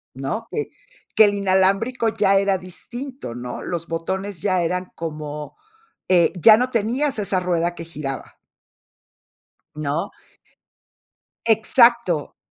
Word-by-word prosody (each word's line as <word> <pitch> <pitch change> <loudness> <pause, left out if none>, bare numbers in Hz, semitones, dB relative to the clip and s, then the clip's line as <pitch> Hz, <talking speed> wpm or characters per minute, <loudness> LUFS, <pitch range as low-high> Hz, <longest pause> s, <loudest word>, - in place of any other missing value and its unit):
¿No? 135 +13 -4
Que 440 - -3 0.5
que 220 - +7
el 205 0 +3
inalámbrico 200 +5 +2
ya 205 -3 +2
era 195 0 +2
distinto, 240 - -7
¿no? 125 0 -6
Los 170 -1 -4
botones 190 +2 -4
ya 185 -2 +1
eran 180 +2 -1
como 150 -2 -6 0.5
eh, 175 -3 +4
ya 215 +5 +8
no 250 +2 0
tenías 240 +4 0
esa 195 -2 0
rueda 175 -1 0
que 165 - -7
giraba. 150 -5 -6 1.4
¿No? 155 +6 -2 1.4
Exacto, 225 - +3
190 Hz, 115 wpm, -22 LUFS, 165-220 Hz, 1.4 s, ya